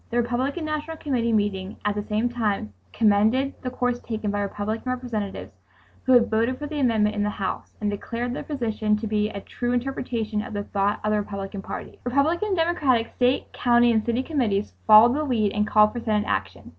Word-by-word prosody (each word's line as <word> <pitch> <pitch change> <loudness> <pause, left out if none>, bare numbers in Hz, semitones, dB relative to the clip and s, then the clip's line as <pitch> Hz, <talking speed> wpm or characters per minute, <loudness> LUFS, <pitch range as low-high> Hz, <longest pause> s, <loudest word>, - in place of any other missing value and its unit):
The 240 - -2
Republican 255 +7 -1
National 305 +1 -3
Committee 245 -7 -1
meeting 205 -3 -1
at 210 - +2
the 210 - -2
same 215 +3 0
time 210 - -2 0.2
commended 225 +6 +3
the 255 - -3
course 245 -1 -1
taken 220 -3 -3
by 205 0 -1
Republican 215 +5 -3
Representatives 235 -6 -4 0.5
who 260 - +4
had 240 -2 +6
voted 230 +4 +1
for 295 - -5
the 295 0 -4
amendment 220 -5 +2
in 205 - -1
the 205 - +1
House, 195 -2 -4
and 210 -1 -1
declared 235 +4 -4
their - - -4
position 220 -6 -1
to 215 - -5
be 210 0 0
"a 200 - -6
true 240 +4 -3
interpretation 240 -4 -2
of 215 - -8
the 205 0 -2
thought 200 +1 0
of 215 - +1
the 210 - +2
Republican 200 -1 -5
Party." - - -8
Republican 290 +10 +1
and 385 -3 0
Democratic 290 -9 +1
state, 250 +1 +1
county 240 -1 +4
and 220 -2 +2
city 235 +3 0
committees 230 -10 -1
followed 220 +3 +8
the 300 +2 0
lead 225 -8 +1
and 210 0 0
called 210 0 +5
for 240 - -3
Senate 215 -2 0
action. 95 -1 -3
230 Hz, 205 wpm, -24 LUFS, 210-255 Hz, 0.5 s, followed